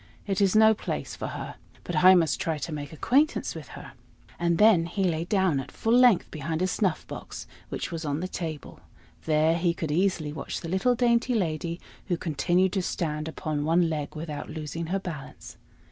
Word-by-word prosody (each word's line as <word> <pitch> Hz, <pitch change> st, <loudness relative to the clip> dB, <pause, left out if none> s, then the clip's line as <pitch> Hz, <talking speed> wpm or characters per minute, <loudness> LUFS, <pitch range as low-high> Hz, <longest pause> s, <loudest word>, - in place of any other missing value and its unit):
It 195 Hz, -1 st, -1 dB
is 195 Hz, 0 st, +3 dB
no 220 Hz, 0 st, +7 dB
place 215 Hz, -, -4 dB
for -, -, -5 dB
her. -, -, -6 dB, 0.3 s
But -, -, -4 dB
I 185 Hz, +1 st, +9 dB
must 165 Hz, -5 st, +2 dB
try 160 Hz, -2 st, -1 dB
to 150 Hz, +3 st, -5 dB
make 145 Hz, -1 st, -5 dB
acquaintance 270 Hz, -, +1 dB
with -, -, -9 dB
her." -, -, -10 dB, 0.5 s
And 170 Hz, -1 st, +1 dB
then 200 Hz, -5 st, +5 dB
he 195 Hz, +3 st, -2 dB
lay 165 Hz, -2 st, 0 dB
down 190 Hz, -6 st, +2 dB
at 135 Hz, -, -6 dB
full 225 Hz, -, 0 dB
length 245 Hz, -6 st, +5 dB
behind 160 Hz, +3 st, -3 dB
a -, -, +3 dB
snuff 185 Hz, -3 st, 0 dB
box -, -, -8 dB, 0.2 s
which -, -, -4 dB
was 165 Hz, -1 st, -4 dB
on 145 Hz, -1 st, -2 dB
the 185 Hz, -, -3 dB
table; 160 Hz, -5 st, -6 dB, 0.5 s
there 155 Hz, +1 st, +3 dB
he 170 Hz, 0 st, +1 dB
could 160 Hz, -3 st, -3 dB
easily 170 Hz, -3 st, 0 dB
watch -, -, -5 dB
the 165 Hz, -, -6 dB
little 190 Hz, +8 st, +2 dB
dainty 240 Hz, 0 st, +2 dB
lady, 170 Hz, -3 st, -2 dB, 0.3 s
who 175 Hz, -3 st, 0 dB
continued 175 Hz, +4 st, +1 dB
to 195 Hz, -, +1 dB
stand 155 Hz, -3 st, -2 dB
upon 155 Hz, -2 st, -3 dB
one 165 Hz, +2 st, +2 dB
leg 150 Hz, -1 st, -4 dB
without 155 Hz, -1 st, -6 dB
losing 160 Hz, +1 st, -5 dB
her 190 Hz, +4 st, 0 dB
balance. 170 Hz, -7 st, -8 dB
170 Hz, 195 wpm, -27 LUFS, 155-190 Hz, 0.5 s, I